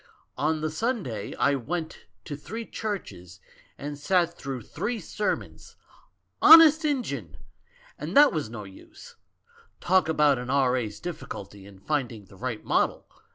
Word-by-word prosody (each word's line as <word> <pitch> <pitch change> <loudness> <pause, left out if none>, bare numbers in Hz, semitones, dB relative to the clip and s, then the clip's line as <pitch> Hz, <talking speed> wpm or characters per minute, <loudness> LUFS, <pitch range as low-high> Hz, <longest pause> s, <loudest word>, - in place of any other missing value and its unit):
On 155 +1 0
the 155 0 -2
Sunday 165 - -3
I 140 - +2
went 160 +5 -4 0.2
to 150 - -5
three 225 +10 -7
churches 90 - -6 0.4
and 145 0 -6
sat 175 +2 +1
through 135 -4 -6
three 230 - -4
sermons. 210 +3 -4 0.7
Honest 320 -1 +9
Injun! 285 -5 -2 0.6
And - - -2
that 290 0 +7
was 155 -9 -2
no 110 -2 -7
use. 100 - -14 0.6
Talk 185 -2 +2
about 150 -4 +3
an 125 0 -6
R.A.'s 125 -6 +1
difficulty 100 - -8
in 100 -1 -14
finding 120 -2 -3
the 95 - -17
right 115 +2 -5
model? - - 0
150 Hz, 135 wpm, -26 LUFS, 115-195 Hz, 0.7 s, Honest